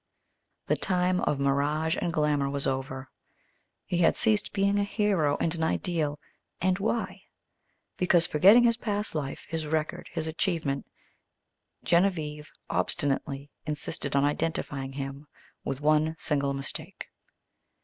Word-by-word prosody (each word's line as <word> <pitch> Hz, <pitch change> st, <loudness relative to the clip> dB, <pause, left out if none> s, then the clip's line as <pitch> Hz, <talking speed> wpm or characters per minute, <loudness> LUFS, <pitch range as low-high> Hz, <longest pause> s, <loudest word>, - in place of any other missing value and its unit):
The -, -, +2 dB
time 180 Hz, 0 st, +2 dB
of 145 Hz, -, 0 dB
mirage 145 Hz, +3 st, +1 dB
and 170 Hz, -, 0 dB
glamour 150 Hz, -3 st, +1 dB
was 140 Hz, 0 st, -1 dB
over. 130 Hz, 0 st, -3 dB, 0.7 s
He 175 Hz, -, -1 dB
had 165 Hz, -, +4 dB
ceased 215 Hz, -3 st, +2 dB
being 200 Hz, 0 st, +2 dB
a -, -, +2 dB
hero 200 Hz, -8 st, +1 dB
and 165 Hz, -, 0 dB
an 165 Hz, -, -3 dB
ideal, 160 Hz, -3 st, -1 dB, 0.4 s
and 185 Hz, +1 st, +1 dB
why? 220 Hz, +3 st, -2 dB, 0.8 s
Because, 175 Hz, -2 st, +4 dB
forgetting 195 Hz, +9 st, +6 dB
his 235 Hz, -1 st, +4 dB
past 210 Hz, -3 st, -1 dB
life, 145 Hz, -3 st, -4 dB
his 160 Hz, -2 st, -3 dB
record, 155 Hz, 0 st, -2 dB
his 165 Hz, -2 st, -3 dB
achievement, 160 Hz, -4 st, -1 dB, 1.0 s
Genevieve 160 Hz, -4 st, +1 dB, 0.2 s
obstinately 140 Hz, -2 st, -1 dB, 0.2 s
insisted 150 Hz, -1 st, -3 dB
on 140 Hz, -, +4 dB
identifying 145 Hz, -3 st, -2 dB
him 135 Hz, +1 st, -6 dB, 0.4 s
with 135 Hz, +1 st, -3 dB
one 155 Hz, +1 st, +3 dB
single 140 Hz, -3 st, 0 dB
mistake. 135 Hz, 0 st, -6 dB
155 Hz, 130 wpm, -28 LUFS, 140-180 Hz, 1.0 s, forgetting